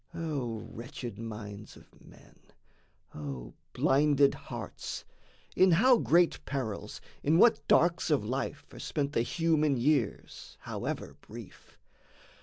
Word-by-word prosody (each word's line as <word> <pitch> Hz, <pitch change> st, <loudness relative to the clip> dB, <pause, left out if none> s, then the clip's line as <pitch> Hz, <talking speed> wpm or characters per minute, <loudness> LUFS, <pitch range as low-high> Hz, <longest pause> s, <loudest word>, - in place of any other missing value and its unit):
O 130 Hz, -9 st, -3 dB
wretched 120 Hz, -2 st, -7 dB
minds 105 Hz, -2 st, -7 dB
of -, -, -20 dB
men! -, -, -18 dB, 0.7 s
O 70 Hz, -5 st, -7 dB, 0.2 s
blinded 140 Hz, 0 st, +4 dB
hearts! -, -, -7 dB, 0.5 s
In 185 Hz, -1 st, +5 dB
how 245 Hz, +8 st, +6 dB
great 170 Hz, -6 st, +3 dB
perils, 130 Hz, -8 st, -4 dB, 0.2 s
in 155 Hz, +3 st, +3 dB
what 225 Hz, +5 st, +6 dB
darks 170 Hz, 0 st, +3 dB
of 145 Hz, -8 st, +2 dB
life 130 Hz, +5 st, -3 dB
Are -, -, -10 dB
spent 145 Hz, -2 st, -2 dB
the 115 Hz, -, +2 dB
human 155 Hz, 0 st, +1 dB
years, 130 Hz, -3 st, -1 dB
however -, -, -5 dB
brief! -, -, -12 dB
140 Hz, 115 wpm, -30 LUFS, 115-160 Hz, 0.7 s, how